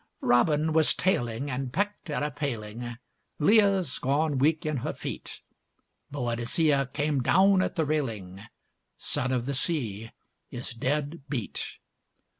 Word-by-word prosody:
Robin 150 +5 +3
was 160 -1 +4
tailing 135 -6 0
and 130 0 -3
pecked 205 +1 -2
at 150 - -1
a 150 - -1
paling, 120 -4 -4 0.4
Leah's 195 - +3
gone 140 +1 +1
weak 155 +3 +2
in 155 -2 0
her 120 - -3
feet; - - -7 0.7
Boadicea 135 +3 +1
came 145 -2 0
down 190 +7 +5
at - - -1
the 160 - +1
railing, 110 -11 -2 0.6
Son 130 - -1
of 125 -2 0
the 140 - -2
Sea 115 - -1 0.4
is 120 - -5
dead 145 +6 -2
beat. 120 -8 -3
140 Hz, 130 wpm, -28 LUFS, 120-155 Hz, 0.7 s, down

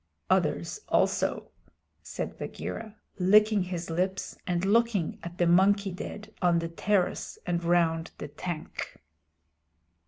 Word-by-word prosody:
"Others - - +1
also," - - +1 0.5
said - - -5
Bagheera, 220 -2 -6 0.2
licking 210 +3 +5
his 180 -2 -4
lips 185 +3 -1
and 175 0 0
looking 215 -4 +2
at 170 +1 -8
the 175 - +3
monkey 195 +3 +4
dead 205 +3 -7
on 175 -2 +4
the 165 0 -2
terrace 185 +2 0
and 175 -1 -1
round 170 -1 +2
the - - -6
tank. 165 +1 -5
180 Hz, 120 wpm, -28 LUFS, 170-200 Hz, 0.5 s, licking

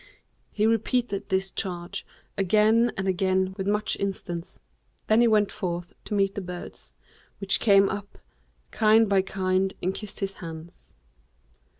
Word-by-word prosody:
He 215 - 0
repeated 225 -2 0
this 190 0 0
charge 180 +1 -4 0.3
again 215 +4 +3
and 190 0 -2
again 190 0 +1
with 195 0 -4
much 210 +1 +1
instance; 185 -3 -4 0.5
then 220 +2 +4
he 240 - +5
went 210 -2 +3
forth 175 -2 -4
to 210 - -3
meet 195 -1 +2
the 200 - -4
birds, 180 -1 -9 0.5
which 195 -1 0
came 200 -2 +5
up, 200 +1 -6 0.5
kind 220 0 +4
by 195 -1 +3
kind, 190 0 -1
and 185 +2 -1
kissed 210 0 -7
his 195 -1 -3
hands. 165 0 -10
195 Hz, 140 wpm, -26 LUFS, 185-210 Hz, 0.5 s, he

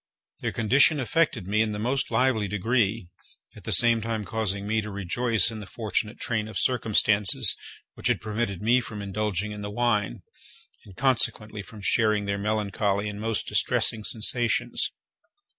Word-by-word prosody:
Their - - -2
condition 135 +7 +3
affected 130 - 0
me 105 +2 +1
in 110 -1 0
the - - -4
most 125 +6 -1
lively 125 -5 +1
degree, 105 -1 0 0.5
at - - -14
the - - -3
same 115 -2 +5
time 110 -1 -3
causing 100 -1 -2
me 110 +1 0
to 105 - -7
rejoice 105 +2 +2
in 110 - -7
the 100 - -9
fortunate 110 0 -3
train 110 -2 -2
of 110 - -7
circumstances 110 -4 +3 0.4
which - - -4
had - - +1
prevented 105 -3 -3
me 120 +3 +4
from 110 -4 -7
indulging 105 0 -2
in 105 0 -7
the 105 - -5
wine, 110 -1 -1 0.6
and 95 -4 -15
consequently 115 -5 +1
from 105 +1 -12
sharing 105 -1 +2
their 100 0 -2
melancholy 105 -1 -1
and 105 0 -7
most 115 -2 -2
distressing 110 - +1
sensations. 120 +2 0
110 Hz, 160 wpm, -26 LUFS, 105-115 Hz, 0.6 s, same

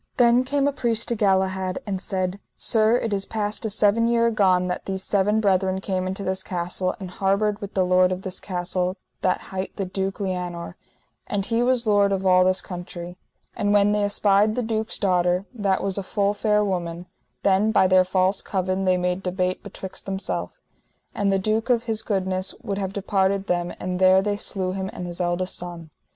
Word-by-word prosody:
Then 240 0 +5
came 280 +1 +1
a - - +2
priest 230 -4 0
to 235 - 0
Galahad, 190 -2 +1
and 195 -3 -3
said: 185 0 -2 0.2
Sir, 220 +1 +3
it 225 -3 -2
is 195 -1 0
past 210 +1 -3
a - - 0
seven 215 +2 +3
year 235 0 +3
agone 185 -4 +3
that 180 - -4
these 190 -1 -3
seven 205 +2 +2
brethren 190 -2 +1
came 185 -1 -2
into 190 +2 -3
this 190 0 -1
castle, 180 0 -1
and 185 -2 -7
harboured 200 +3 0
with 200 0 -7
the 190 -1 +3
lord 185 0 +4
of 185 +1 -3
this 190 -1 -4
castle 180 0 -2 0.2
that 185 - +1
hight 190 0 -4
the 195 - -2
Duke 190 +2 -3
Lianour, 180 -3 -4 0.5
and 200 -2 0
he 230 +2 +1
was 250 -1 +2
lord 205 -2 +3
of 195 -1 -1
all 185 -1 +5
this 185 0 +2
country. 175 -1 -7 0.4
And 205 0 +1
when 205 0 +4
they 210 0 +1
espied 205 +1 +3
the 250 - -1
duke's 220 0 -1
daughter, 180 -1 +1
that 200 -5 0
was 195 0 0
a - - -2
full 200 +1 0
fair 210 0 +1
woman, 175 -2 -3 0.4
then 200 +3 +3
by 190 - +4
their 185 0 +5
false 185 +1 +1
covin 190 0 -1
they 185 -1 +3
made 180 +1 -1
debate 185 0 -1
betwixt 195 -2 -8
themself, 90 - -4 0.5
and 200 -1 0
the 195 - +3
duke 215 +5 -1
of 235 -2 +3
his 225 -2 -1
goodness 190 -3 -1
would 200 0 -3
have 190 -1 -2
departed 195 0 0
them, 175 -2 -1
and 180 0 -3
there 190 0 +5
they 205 0 0
slew 190 -3 -2
him 190 0 -3
and 180 - -6
his 175 0 -5
eldest 175 +1 -1
son. 170 -3 -6
190 Hz, 200 wpm, -24 LUFS, 185-205 Hz, 0.5 s, Then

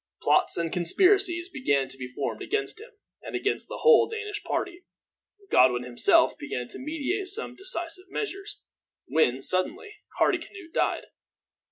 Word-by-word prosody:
Plots - - +2
and 165 -1 -2
conspiracies 350 - +3
began 200 - 0
to 130 - -6
be 130 -1 -7
formed 125 - -4
against 420 0 -2
him, 460 - -12 0.3
and - - -7
against 415 - -1
the - - -8
whole 470 - +6
Danish 425 -2 -5
party. 365 -2 -3 0.7
Godwin 125 -1 +4
himself 125 -1 +3
began 125 0 -5
to - - -9
meditate 320 +7 -3
some 415 +5 +1
decisive 370 -1 -1
measures, 400 0 -5 0.4
when, 135 -4 +1
suddenly, 370 - -1 0.2
Hardicanute 370 -5 -1
died. - - 0
350 Hz, 140 wpm, -26 LUFS, -, 0.7 s, whole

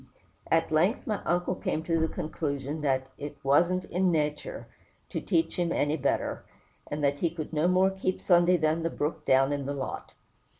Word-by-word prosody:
At 165 0 +2
length 170 +8 +2
my 210 -3 -2
uncle 175 +1 +1
came 160 -3 -2
to 165 0 +1
the 160 - +2
conclusion 150 -2 -3
that 135 -2 0
"it 145 0 -6
wasn't 175 +7 +3
in 185 +1 +1
natur' 150 -2 -2 0.5
to - - -2
teach 325 -9 0
him 175 -1 0
any 145 -1 +1
better," 145 - -1 0.5
and 145 0 -3
that 140 0 +1
"he 170 - +1
could 160 -1 -7
no 155 +2 +2
more 185 +1 +4
keep 190 -1 -2
Sunday 175 0 +4
than 155 0 +1
the 165 - 0
brook 150 0 -3
down 135 +2 +4
in 140 -1 -3
the 140 - -2
lot." 135 - -5
160 Hz, 185 wpm, -28 LUFS, 145-175 Hz, 0.5 s, more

